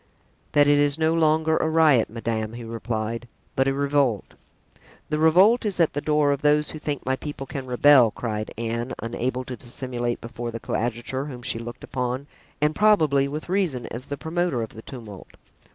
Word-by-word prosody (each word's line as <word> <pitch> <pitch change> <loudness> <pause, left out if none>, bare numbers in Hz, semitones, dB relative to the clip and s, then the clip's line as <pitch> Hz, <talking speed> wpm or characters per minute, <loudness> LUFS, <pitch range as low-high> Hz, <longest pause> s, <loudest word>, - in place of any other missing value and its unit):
"That 145 0 +6
it 145 0 +4
is 145 0 +3
no 160 0 +2
longer 160 0 +3
a 160 - +1
riot, 155 -7 +4
madame," 115 -1 -3
he 120 0 -7
replied, 115 0 -4 0.3
"but 135 0 +2
a 135 - +2
revolt." 140 -6 0 0.8
"The 150 - 0
revolt 185 +9 +5
is 205 -4 -1
at 165 - +3
the 145 - -2
door 150 -1 +2
of 140 0 -1
those 150 0 +2
who 155 - -7
think 145 -2 -4
my 130 +1 +1
people 145 0 -6
can 135 0 -6
rebel," 125 -1 +6
cried 110 -1 -4
Anne, 115 +2 -3
unable 125 +2 -2
to 125 0 -6
dissimulate 120 0 -4
before 120 0 -6
the 115 0 -5
coadjutor, 120 +4 -3
whom 125 -4 -8
she 115 - -1
looked 120 +1 -8
upon, 125 +1 -3 0.3
and 150 +1 +2
probably 155 -10 +4
with 150 +2 -5
reason, 175 -10 0
as 120 +3 -5
the 145 - -5
promoter 160 -4 -1
of 110 - -6
the 110 - -10
tumult. 110 -6 -10
135 Hz, 185 wpm, -24 LUFS, 120-150 Hz, 0.8 s, That